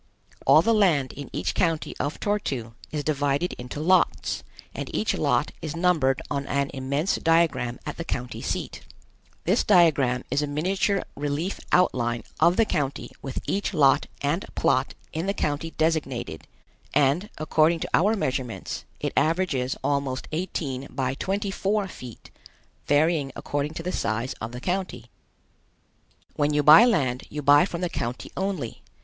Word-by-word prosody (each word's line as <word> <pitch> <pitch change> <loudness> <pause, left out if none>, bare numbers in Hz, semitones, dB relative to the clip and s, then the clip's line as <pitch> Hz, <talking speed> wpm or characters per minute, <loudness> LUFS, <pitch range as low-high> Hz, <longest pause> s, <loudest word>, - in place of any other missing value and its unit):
All - - +7
the 230 - +3
land 170 -11 +3
in 140 0 -8
each 90 - -2
county 165 -3 0
of 145 +4 -2
Tor 205 0 +1
tu 120 - -4 0.2
is 150 -1 -3
divided 145 +3 0
into 125 +4 -6
lots, 180 +3 +2 0.3
and - - -5
each - - +1
lot - - +1
is 155 -1 -4
numbered 165 -7 +2
on 140 -1 -2
an 140 0 0
immense 140 +6 -1
diagram 155 -8 +2
at - - -5
the 165 - -3
county 125 -6 -4
seat. - - -4 0.6
This - - +2
diagram 140 -8 +4
is 145 - +2
a 150 - -1
miniature 190 +7 0
relief 145 +6 -2
outline 120 -10 +2 0.2
of 175 +1 +4
the 225 - +5
county 140 -8 -2
with 135 -2 -5
each 200 -1 -1
lot 140 -4 +4 0.2
and 150 +7 0
plot 130 +2 +1 0.2
in 165 +4 -2
the 200 - 0
county 150 +2 -1
designated, 135 - -1 0.5
and, 150 +8 +3
according 155 +2 +2
to - - -3
our 205 +6 +4
measurements, 130 - -3
it - - -2
averages 155 -7 +1
almost 140 -2 -1
eighteen 145 -5 -3
by 130 -1 -2
twenty 195 +7 -2
four 200 +1 0
feet, 125 - -11 0.6
varying 145 -1 +2
according 145 +2 -3
to 165 - -5
the 180 - -2
size 115 -1 -1
of 110 +1 -4
the 125 0 -7
county. 185 +3 -3 1.2
When 145 0 +1
you 150 - +3
buy 155 +10 +9
land 130 - +1
you 150 0 -5
buy 145 +3 +6
from 175 -2 -5
the 180 - +1
county 120 -6 -4
only. 185 - -3
150 Hz, 155 wpm, -25 LUFS, 135-175 Hz, 1.2 s, buy